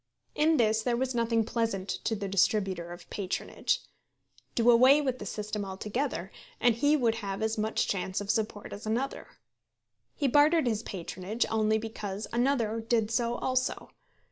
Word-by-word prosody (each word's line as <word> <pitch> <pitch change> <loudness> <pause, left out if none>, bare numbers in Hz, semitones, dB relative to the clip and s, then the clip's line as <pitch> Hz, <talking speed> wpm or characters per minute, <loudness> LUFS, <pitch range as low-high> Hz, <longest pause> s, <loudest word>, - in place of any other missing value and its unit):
In 315 +1 +3
this 220 -2 +3
there 235 +1 0
was 260 +1 -1
nothing 230 -1 +2
pleasant 225 -4 -2 0.2
to 225 - +1
the 200 -1 -4
distributer 190 -2 +1
of 175 - -10
patronage. 190 -2 -2 0.7
Do 240 +1 +5
away 255 +5 +7
with 260 -4 -1
the 205 - -6
system 210 0 -3
altogether, 200 +1 -3 0.3
and 240 -1 +4
he 290 +6 +3
would 235 -5 +2
have 195 +1 -3
as 220 0 0
much 215 +1 0
chance 185 -1 -1
of 205 0 0
support 215 -2 -3
as 205 +1 -8
another. 245 +5 -2 0.9
He 285 - 0
bartered 295 +4 +4
his 220 -3 0
patronage 190 +2 -3
only 220 -1 +2
because 215 -2 -5
another 235 -3 +1
did 225 -1 0
so 235 0 +1
also. 255 +1 -1
225 Hz, 160 wpm, -29 LUFS, 205-245 Hz, 0.9 s, away